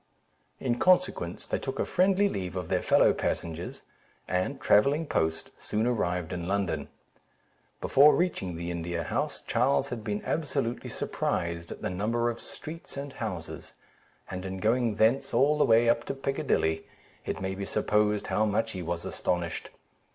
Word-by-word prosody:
In 120 -2 -1
consequence, 185 0 +2
they - - -1
took - - -4
a - - 0
friendly 195 +2 +3
leave 95 - -4
of 90 -3 -4
their - - +1
fellow - - +5
passengers, 85 +1 -3 0.4
and 90 0 -1
travelling 140 +10 +4
post, 80 - -1
soon 110 +2 -1
arrived 90 -8 0
in 85 -1 -4
London. 95 -7 -1 0.9
Before 145 +3 +6
reaching 155 - -1
the 85 +1 -4
India 85 0 -3
House, - - -2
Charles 70 0 +2
had 115 -3 -5
been 105 -1 -2
absolutely 140 -6 -1
surprised 85 -1 -2
at - - -8
the - - -1
number 115 +5 0
of 115 - -9
streets 160 -1 -9
and 140 0 -5
houses; 95 -8 -6 0.5
and 90 0 -5
in 95 0 -4
going 115 +2 +1
thence 125 +6 +2
all 145 +3 +4
the - - +5
way 115 +1 +5
up 115 0 +3
to - - -3
Piccadilly, 135 -12 0 0.4
it - - -2
may 95 0 -2
be 100 +1 -4
supposed 105 0 +1
how 110 - +1
much 110 +2 +1
he 95 - -5
was 85 0 -3
astonished. 85 -2 -2
105 Hz, 160 wpm, -28 LUFS, 90-125 Hz, 0.9 s, Before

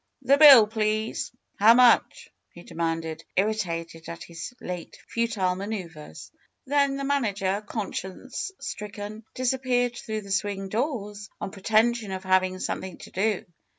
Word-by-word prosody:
^'The 280 +1 +5
bill, 275 -8 +10
please! 215 0 -1 0.3
How 220 +3 +7
much?" 245 -1 +4 0.2
he 175 - -12
demanded, 165 -1 -3
irri 210 +3 +3
tated 165 -3 -6
at 170 - -7
his 170 +6 -8
late 180 -2 -7
futile 220 -6 0
maneuvers. 185 -6 -7 0.3
Then 280 0 +2
the 275 - -4
manager, 205 -8 0
conscience 210 - -5
stricken, 210 -4 -7
disappeared 250 -1 0
through 215 -2 -4
the 200 -1 -10
swing 195 0 -1
doors, 210 -3 -3
on - - -5
pretention 220 +2 +1
of 190 0 -5
having 185 0 +2
some - - -3
thing 190 -2 -8
to - - -12
do. 210 +2 0
210 Hz, 140 wpm, -26 LUFS, 185-235 Hz, 0.3 s, bill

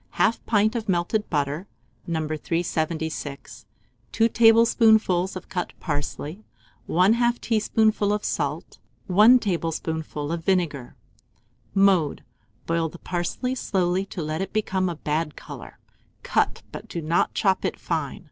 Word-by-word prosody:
1/2 230 - +2
pint 215 0 +3
of 225 -3 -4
melted 190 +4 0
butter, 150 +4 -1 0.4
No. 160 -2 -1
376, 160 -2 -3 0.4
2 225 0 +3
tablespoonfuls 225 -5 +4
of 185 - -7
cut 180 -2 -4
parsley, 150 +4 -4 0.5
1/2 235 +7 +3
teaspoonful 215 -2 +1
of 210 0 -1
salt, 150 +2 -3 0.3
1 215 +7 +7
tablespoonful 160 -6 -3
of 165 -1 -3
vinegar. 165 -9 -1 0.8
Mode. 195 -6 +3 0.4
Boil 165 -1 0
the 175 - -12
parsley 180 +10 -3
slowly 185 -6 0
to 175 - -5
let 155 +3 -3
it 195 - -4
become 190 -3 0
a 170 - -4
bad 150 0 -2
colour; - - -10 0.5
cut, - - 0
but - - -8
do 170 - -5
not 165 +2 0
chop 190 -3 +2
it - - -2
fine. 155 -5 -3
175 Hz, 130 wpm, -24 LUFS, 160-210 Hz, 0.8 s, 1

